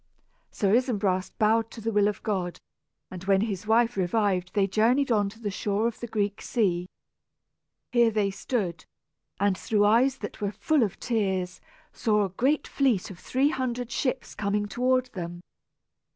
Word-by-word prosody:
Sir 200 Hz, -1 st, 0 dB
Isumbras 205 Hz, -7 st, +1 dB
bowed 225 Hz, +1 st, +2 dB
to 230 Hz, -, -10 dB
the 225 Hz, +1 st, -2 dB
will 205 Hz, -1 st, +3 dB
of 210 Hz, -, -3 dB
God; 185 Hz, -5 st, -2 dB, 0.5 s
and 185 Hz, -1 st, -7 dB
when 195 Hz, 0 st, +3 dB
his 210 Hz, -2 st, -3 dB
wife 230 Hz, +2 st, +3 dB
revived 190 Hz, -1 st, 0 dB
they 200 Hz, -2 st, +4 dB
journeyed 235 Hz, +7 st, +2 dB
on 205 Hz, -3 st, +2 dB
to 220 Hz, +3 st, -15 dB
the 210 Hz, -3 st, -3 dB
shore 205 Hz, +2 st, -1 dB
of 235 Hz, -1 st, -2 dB
the 240 Hz, -, -5 dB
Greek 205 Hz, -2 st, -2 dB
sea. 180 Hz, -6 st, 0 dB, 1.0 s
Here 235 Hz, -2 st, +4 dB
they 210 Hz, -2 st, 0 dB
stood, 195 Hz, -4 st, -3 dB, 0.5 s
and, 200 Hz, -1 st, +2 dB
through 205 Hz, +2 st, +1 dB
eyes 245 Hz, +6 st, +4 dB
that 205 Hz, -, -7 dB
were 205 Hz, 0 st, -1 dB
full 290 Hz, -, +1 dB
of 210 Hz, -5 st, -1 dB
tears, 190 Hz, -6 st, -1 dB, 0.3 s
saw 210 Hz, -3 st, +2 dB
a -, -, -4 dB
great 265 Hz, +11 st, 0 dB
fleet 250 Hz, -10 st, +1 dB
of 180 Hz, -, -11 dB
three 270 Hz, +3 st, +1 dB
hundred 250 Hz, -3 st, -3 dB
ships 255 Hz, +1 st, -2 dB
coming 205 Hz, 0 st, -1 dB
toward 255 Hz, +4 st, +1 dB
them. 175 Hz, -2 st, -6 dB
210 Hz, 165 wpm, -27 LUFS, 195-235 Hz, 1.0 s, they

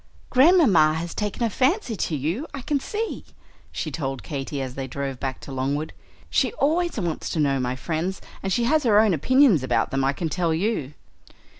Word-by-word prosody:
"Grandmamma 255 Hz, -, +5 dB
has 165 Hz, +1 st, -4 dB
taken 210 Hz, +2 st, -3 dB
a 230 Hz, -, +2 dB
fancy 265 Hz, -, +1 dB
to 170 Hz, -4 st, -2 dB
you, 165 Hz, -, -2 dB
I 270 Hz, -, -7 dB
can 290 Hz, +1 st, 0 dB
see," 430 Hz, +10 st, -4 dB, 0.5 s
she -, -, -4 dB
told 135 Hz, -4 st, -4 dB
Katy, 140 Hz, -1 st, -4 dB
as 130 Hz, -2 st, -4 dB
they 135 Hz, 0 st, -5 dB
drove 135 Hz, 0 st, -4 dB
back 135 Hz, 0 st, -3 dB
to -, -, -9 dB
Longwood. 140 Hz, +4 st, -2 dB, 0.4 s
"She -, -, +2 dB
always 340 Hz, -, 0 dB
wants 170 Hz, -5 st, -3 dB
to 165 Hz, -, -2 dB
know 140 Hz, -2 st, +2 dB
my 125 Hz, 0 st, -1 dB
friends; 170 Hz, +7 st, -3 dB, 0.2 s
and 195 Hz, -, -3 dB
she 235 Hz, +6 st, +1 dB
has 305 Hz, +6 st, +3 dB
her 220 Hz, -6 st, +4 dB
own 215 Hz, -3 st, +4 dB
opinions 250 Hz, -, +4 dB
about 130 Hz, -, 0 dB
them, 135 Hz, 0 st, 0 dB
I 135 Hz, +1 st, +2 dB
can 165 Hz, -, -3 dB
tell 165 Hz, 0 st, 0 dB
you." 160 Hz, -, -2 dB
170 Hz, 195 wpm, -24 LUFS, -, 0.5 s, Grandmamma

